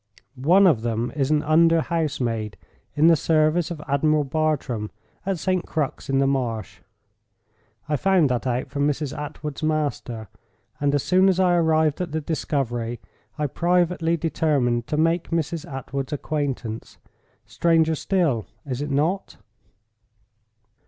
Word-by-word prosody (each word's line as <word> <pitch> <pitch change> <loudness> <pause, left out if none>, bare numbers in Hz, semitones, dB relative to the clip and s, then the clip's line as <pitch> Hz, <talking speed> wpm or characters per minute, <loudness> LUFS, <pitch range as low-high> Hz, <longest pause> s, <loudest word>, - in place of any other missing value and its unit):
One 170 +10 +4
of 155 -12 +4
them 115 +1 -2
is 135 -2 0
an 150 -1 +2
under 165 +1 +4
housemaid 125 -11 -2 0.4
in 150 - +3
the 165 0 +7
service 155 +2 +2
of 170 -3 -6
Admiral 150 +2 +2
Bartram, 140 -7 -1 0.4
at 195 -2 0
St. 185 +2 0
Crux 150 -4 -3
in 135 - +2
the 135 - +3
Marsh. 120 -7 -2 1.1
I 150 - +1
found 190 -2 +3
that 125 +1 -1
out 125 0 -2
from 145 0 +1
Mrs. 150 -1 -2
Attwood's 150 -1 -6
master; 145 -7 -2 0.5
and 145 0 +1
as 145 - 0
soon 185 +1 +4
as 185 -1 +1
I 180 -1 +4
arrived 160 -2 +2
at 170 -4 -4
the 160 - 0
discovery, 120 -7 -2 0.4
I 150 - 0
privately 170 +2 +1
determined 140 -7 0
to 150 - -2
make 165 +2 +1
Mrs. 165 0 -2
Attwood's 135 0 -5
acquaintance. 135 -7 -4 0.5
Stranger 165 -1 +2
still, 150 - 0 0.2
is 130 -1 -4
it 145 - -3
not?" 155 +8 -1
150 Hz, 140 wpm, -23 LUFS, 135-165 Hz, 1.1 s, the